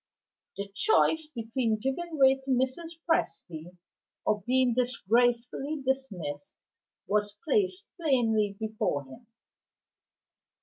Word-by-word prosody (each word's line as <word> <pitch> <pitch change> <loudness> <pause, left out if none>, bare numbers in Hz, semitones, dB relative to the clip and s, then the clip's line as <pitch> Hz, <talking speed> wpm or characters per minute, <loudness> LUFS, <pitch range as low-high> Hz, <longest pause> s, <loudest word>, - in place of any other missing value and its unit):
The 200 0 -4
choice 320 - +3
between 230 -1 0
giving 310 +8 -3
way 270 -1 +5
to 270 +1 -11
Mrs. 265 +6 0
Presty, 175 - -2 0.5
or 210 -1 +1
being 255 -1 +3
disgracefully 245 +4 +1
dismissed, 185 - -3 0.5
was 210 0 0
placed 380 +3 +1
plainly 225 -9 +2
before 215 -10 -1
him. 225 - -14
245 Hz, 95 wpm, -29 LUFS, 210-270 Hz, 0.5 s, way